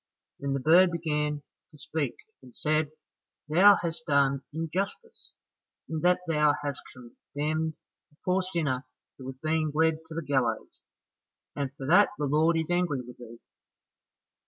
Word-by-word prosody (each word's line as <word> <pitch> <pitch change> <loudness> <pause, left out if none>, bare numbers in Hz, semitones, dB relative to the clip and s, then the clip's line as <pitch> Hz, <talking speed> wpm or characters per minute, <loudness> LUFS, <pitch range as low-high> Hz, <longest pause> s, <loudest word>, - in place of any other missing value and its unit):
Then 140 -1 -2
the 135 - 0
bird 170 +6 +6
began 150 -3 -2 0.3
to 150 - -18
speak 145 -2 -3 0.3
and 125 -2 -16
said, 155 0 +1 0.6
"Thou 190 +7 +7
hast 170 +7 -4
done 140 -2 +3
injustice, 185 - -5 0.5
in 160 - -3
that 180 +1 +3
thou 150 -2 +3
hast 145 -1 -3
condemned 150 +5 -4 0.4
a - - -27
poor 185 +1 +2
sinner 150 -8 -2 0.3
who 130 - -9
was 130 0 -6
being 155 -1 +1
led 160 0 +3
to 160 - -9
the 165 - -3
gallows, 130 -5 -1 0.7
and 140 -2 -2
for 135 - -7
that 180 +8 +6
the 145 - -1
Lord 155 +4 +3
is 160 +1 -2
angry 175 -7 +1
with 125 0 -13
thee. 120 -1 -11
155 Hz, 150 wpm, -28 LUFS, 140-165 Hz, 0.7 s, Thou